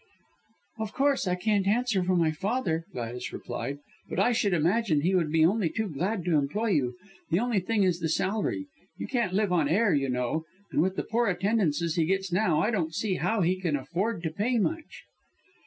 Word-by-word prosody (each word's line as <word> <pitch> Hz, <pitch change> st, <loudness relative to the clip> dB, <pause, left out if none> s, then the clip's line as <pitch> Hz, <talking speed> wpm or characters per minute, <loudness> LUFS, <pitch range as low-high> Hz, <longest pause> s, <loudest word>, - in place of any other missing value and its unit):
"Of 220 Hz, -1 st, -4 dB
course 275 Hz, -6 st, +1 dB
I 180 Hz, -, +1 dB
can't 200 Hz, +1 st, +1 dB
answer 220 Hz, -2 st, +2 dB
for 185 Hz, +1 st, +1 dB
my 165 Hz, -2 st, +3 dB
father," 175 Hz, -1 st, -1 dB
Gladys 125 Hz, 0 st, -5 dB
replied, 135 Hz, +4 st, -5 dB, 0.3 s
"but -, -, -2 dB
I 245 Hz, -, +4 dB
should 215 Hz, -4 st, +1 dB
imagine 170 Hz, 0 st, +2 dB
he 180 Hz, +5 st, +1 dB
would 170 Hz, -5 st, +1 dB
be 160 Hz, 0 st, +4 dB
only 195 Hz, 0 st, +2 dB
too 220 Hz, +4 st, -2 dB
glad 180 Hz, +5 st, -2 dB
to 165 Hz, -4 st, +3 dB
employ 210 Hz, +12 st, -1 dB
you. 140 Hz, -10 st, +1 dB, 0.3 s
The 165 Hz, -, +2 dB
only 235 Hz, -3 st, +1 dB
thing 205 Hz, +2 st, +1 dB
is 180 Hz, -2 st, +1 dB
the 165 Hz, -2 st, -1 dB
salary. 210 Hz, -, -1 dB, 0.3 s
You -, -, -4 dB
can't 235 Hz, -8 st, -1 dB
live 205 Hz, -1 st, +1 dB
on 160 Hz, -5 st, +2 dB
air, 200 Hz, +3 st, +3 dB
you 135 Hz, -2 st, +1 dB
know, 125 Hz, +6 st, -1 dB, 0.3 s
and -, -, +2 dB
with 185 Hz, +3 st, 0 dB
the -, -, -2 dB
poor 235 Hz, +1 st, 0 dB
attendances 180 Hz, -5 st, 0 dB
he 165 Hz, -, +3 dB
gets 190 Hz, 0 st, 0 dB
now, 175 Hz, -5 st, +2 dB
I 215 Hz, -, +1 dB
don't 165 Hz, -7 st, -1 dB
see 195 Hz, -1 st, -1 dB
how 220 Hz, -2 st, 0 dB
he 185 Hz, +2 st, +1 dB
can 165 Hz, -5 st, 0 dB
afford 180 Hz, -, -2 dB
to 160 Hz, -, -1 dB
pay 225 Hz, +9 st, 0 dB
much." 315 Hz, +8 st, -2 dB
185 Hz, 205 wpm, -28 LUFS, 160-220 Hz, 0.3 s, I